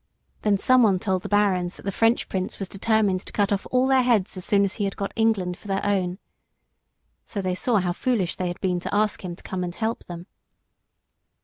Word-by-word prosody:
Then 205 Hz, -2 st, +2 dB
someone 225 Hz, -3 st, +4 dB
told 190 Hz, -1 st, -1 dB
the -, -, -7 dB
barons 195 Hz, -4 st, +2 dB
that -, -, -13 dB
the 200 Hz, -, -2 dB
French 225 Hz, +4 st, +2 dB
Prince 185 Hz, -1 st, -3 dB
was 195 Hz, -, -4 dB
determined 205 Hz, -1 st, +1 dB
to -, -, -10 dB
cut 205 Hz, -1 st, +1 dB
off 200 Hz, -1 st, -1 dB
all 255 Hz, 0 st, +3 dB
their 265 Hz, -1 st, +4 dB
heads 230 Hz, -7 st, +1 dB
as 185 Hz, -, -5 dB
soon 200 Hz, +1 st, +3 dB
as 195 Hz, 0 st, 0 dB
he -, -, +2 dB
had 195 Hz, -, -3 dB
got 200 Hz, -, -3 dB
England 205 Hz, -6 st, +1 dB
for 205 Hz, -, -7 dB
his 195 Hz, -, +1 dB
own. 190 Hz, -3 st, 0 dB, 1.1 s
So 205 Hz, -, -5 dB
they 185 Hz, -1 st, -1 dB
saw 230 Hz, +6 st, 0 dB
how 180 Hz, -2 st, 0 dB
foolish 205 Hz, -4 st, 0 dB
they 185 Hz, -, -2 dB
had 175 Hz, +2 st, -5 dB
been 180 Hz, -2 st, 0 dB
to 180 Hz, -, -4 dB
ask 210 Hz, 0 st, +1 dB
him 175 Hz, -2 st, -5 dB
to -, -, -16 dB
come 185 Hz, -1 st, -3 dB
and 175 Hz, -1 st, -5 dB
help 225 Hz, 0 st, -2 dB
them. 175 Hz, 0 st, -8 dB
195 Hz, 225 wpm, -24 LUFS, 185-220 Hz, 1.1 s, someone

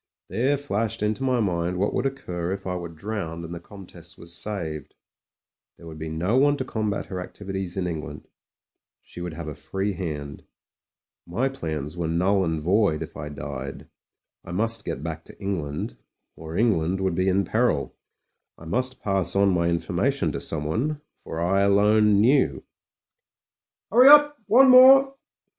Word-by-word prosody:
There 135 Hz, +5 st, +1 dB
flashed 115 Hz, -7 st, -2 dB
into 105 Hz, +3 st, -1 dB
my 130 Hz, -2 st, +1 dB
mind 90 Hz, -3 st, -1 dB
what 100 Hz, +3 st, 0 dB
would -, -, 0 dB
occur 90 Hz, -10 st, -4 dB
if 95 Hz, 0 st, -5 dB
I 90 Hz, -1 st, -2 dB
were 85 Hz, -1 st, -5 dB
drpwned 85 Hz, -1 st, -5 dB
and 85 Hz, -, -7 dB
the 85 Hz, -, -6 dB
Comtesse 85 Hz, -3 st, -12 dB
was 85 Hz, 0 st, -8 dB
saved. 85 Hz, -8 st, -5 dB, 0.8 s
There -, -, -14 dB
would 80 Hz, -1 st, -9 dB
be 80 Hz, +1 st, -5 dB
no 90 Hz, +9 st, 0 dB
one 145 Hz, +2 st, +4 dB
to 130 Hz, -, -3 dB
combat 110 Hz, -4 st, -2 dB
her 95 Hz, -2 st, -5 dB
activities 95 Hz, -1 st, -6 dB
in 95 Hz, -, -1 dB
England; 80 Hz, -3 st, -6 dB, 0.8 s
she 90 Hz, -, -11 dB
would 90 Hz, -2 st, -5 dB
have 80 Hz, -1 st, -7 dB
a 75 Hz, -, -4 dB
free 95 Hz, +6 st, -3 dB
hand. 75 Hz, -6 st, -6 dB, 0.8 s
My 120 Hz, +11 st, 0 dB
plans 80 Hz, -, -5 dB
were 85 Hz, -2 st, -2 dB
null 95 Hz, +4 st, +2 dB
and 80 Hz, -3 st, -1 dB
void 90 Hz, 0 st, +1 dB
if -, -, -11 dB
I 75 Hz, +1 st, -6 dB
died; 70 Hz, -1 st, -7 dB, 0.6 s
I -, -, -9 dB
must 115 Hz, +4 st, -1 dB
get 70 Hz, -, -4 dB
back 80 Hz, -1 st, -5 dB
to -, -, -13 dB
England 80 Hz, -8 st, -4 dB, 0.2 s
— -, -, -56 dB
or 80 Hz, +2 st, -7 dB
Eng 110 Hz, -6 st, +3 dB
land 85 Hz, +4 st, -2 dB
would 95 Hz, -2 st, 0 dB
be 95 Hz, +2 st, 0 dB
in 95 Hz, +1 st, +1 dB
peril. 110 Hz, -, 0 dB, 0.6 s
I 80 Hz, -, -13 dB
must 125 Hz, +9 st, -2 dB
pass 95 Hz, -2 st, 0 dB
on 100 Hz, -1 st, +4 dB
my 85 Hz, -1 st, +1 dB
informa 85 Hz, 0 st, 0 dB
tion -, -, -2 dB
to -, -, -5 dB
someone 110 Hz, -, -2 dB
— -, -, -47 dB
for 80 Hz, -, -6 dB
I 95 Hz, +4 st, +2 dB
alone 105 Hz, +1 st, +4 dB
knew. 110 Hz, -, +3 dB, 1.3 s
"Hurry 250 Hz, +5 st, +8 dB
up! 295 Hz, 0 st, +7 dB
one 250 Hz, +6 st, +7 dB
more." 265 Hz, +1 st, +8 dB
95 Hz, 175 wpm, -24 LUFS, 80-110 Hz, 1.3 s, Hurry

